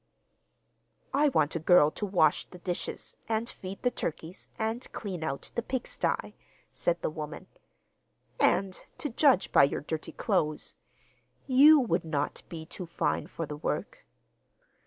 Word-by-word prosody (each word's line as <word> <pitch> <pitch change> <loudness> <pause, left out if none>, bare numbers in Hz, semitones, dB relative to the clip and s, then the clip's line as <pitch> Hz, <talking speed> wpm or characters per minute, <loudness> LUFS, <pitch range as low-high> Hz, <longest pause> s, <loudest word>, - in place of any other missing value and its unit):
'I 290 +2 +4
want 155 - +1
a - - 0
girl 160 -2 +5
to 205 - -4
wash 160 -6 +3
the 180 - -13
dishes 175 0 -5
and 225 +1 0
feed 190 -2 -8
the 245 - +3
turkeys, 165 -1 -5
and 225 +3 -3
clean 185 -6 -5
out 140 -3 -4
the 235 - -1
pig 255 +1 -3
sty,' - - -2 0.4
said 175 0 0
the - - +1
w 155 -1 -4
omen, 150 0 -10 0.9
'and, 190 -2 +2
to 295 - -3
judge 260 -4 +3
by - - +7
your 140 - +1
dirty 155 +1 -4
clothes, 155 -8 -1 0.7
you 290 +4 +7
would 190 -9 +1
not 150 -3 -2
be 160 -2 -7
too 180 +2 -7
fine 170 - -1
for 165 - -5
the 150 0 -6
work. - - -4
180 Hz, 155 wpm, -29 LUFS, 155-225 Hz, 0.9 s, by